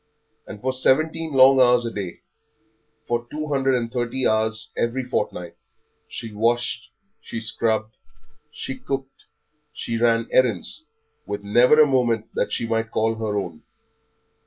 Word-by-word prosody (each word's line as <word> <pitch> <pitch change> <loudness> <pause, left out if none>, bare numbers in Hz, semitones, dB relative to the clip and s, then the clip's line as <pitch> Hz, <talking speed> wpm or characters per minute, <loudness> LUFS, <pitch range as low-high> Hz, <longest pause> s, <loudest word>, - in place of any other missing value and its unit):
And 105 - -8
for 130 0 -1
seventeen 155 +5 +1
long 135 0 +7
hours 125 -1 +4
every 100 -6 -4
day, - - -28 0.9
for 120 0 -2
two 155 0 -5
hundred 135 -2 +2
and 120 -1 -2
thirty 125 +1 0
hours 110 0 0
every 120 +3 -1
fortnight, 105 -7 -3 0.5
she 115 -3 -7
washed, 120 +3 0 0.3
she 115 - -6
scrubbed, 110 0 -1 0.5
she 135 - -6
cooked, 135 0 -5 0.5
she 115 -1 -4
ran 115 -1 +3
errands, 125 - +1 0.4
with 100 0 -4
never 120 +8 +5
a 155 - +9
moment 120 -5 0
that - - -1
she - - -1
might 115 -1 -1
call 110 +1 +1
her 110 -2 -3
own. 90 -5 -4
120 Hz, 140 wpm, -23 LUFS, 110-130 Hz, 0.9 s, a